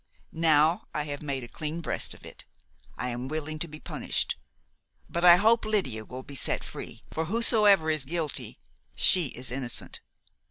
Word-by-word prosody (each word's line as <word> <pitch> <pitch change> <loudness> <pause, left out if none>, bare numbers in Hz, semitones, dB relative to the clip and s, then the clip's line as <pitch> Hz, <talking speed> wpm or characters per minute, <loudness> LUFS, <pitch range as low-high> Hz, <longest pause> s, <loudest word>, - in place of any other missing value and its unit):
Now 160 0 +3
I 150 - 0
have 145 -1 -5
made 140 -3 -3
a - - -7
clean 155 +5 -4
breast 165 - -2
of - - -15
it - - -10 0.5
I 125 - -2
am 120 +1 -4
willing 155 +1 -4
to 170 - -1
be 155 -1 -10
punished; - - -1 0.7
but 170 - -3
I 175 -1 +10
hope 225 +5 +4
Lydia 135 - -1
will 130 +3 -8
be 140 - -11
set 135 - 0
free, - - -8
for 160 - -2
whosoever 210 -3 +4
is 155 -3 0
guilty, 160 0 -4 0.4
she 180 -5 +5
is 125 -1 -5
innocent. 125 -2 -3
155 Hz, 170 wpm, -28 LUFS, 135-175 Hz, 0.7 s, I